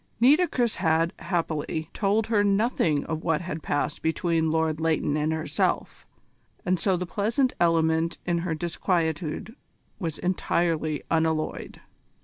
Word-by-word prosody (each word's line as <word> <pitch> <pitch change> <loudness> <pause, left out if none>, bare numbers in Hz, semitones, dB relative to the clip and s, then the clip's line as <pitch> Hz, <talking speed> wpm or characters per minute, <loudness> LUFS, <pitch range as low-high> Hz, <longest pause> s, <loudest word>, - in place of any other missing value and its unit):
Nitocris 255 -2 +3
had, 165 -1 +2
happily, 160 -3 -2
told 210 +2 +1
her 220 -2 +2
nothing 200 - +1
of 160 -1 -3
what 160 -2 +1
had 165 -2 -5
passed 145 0 -2
between 160 0 +1
Lord 160 -1 0
Leighton 160 -2 +1
and 155 +1 0
herself, 160 0 -1 0.6
and 185 -1 +1
so 185 +1 +2
the 180 - -3
pleasant 225 +8 0
element 165 -1 +2
in 175 -1 +1
her 170 -1 -2
disquietude 170 +2 -2 0.4
was 165 -6 -3
entirely 165 -4 0
unalloyed. 160 -1 -1
165 Hz, 125 wpm, -26 LUFS, 160-185 Hz, 0.6 s, Nitocris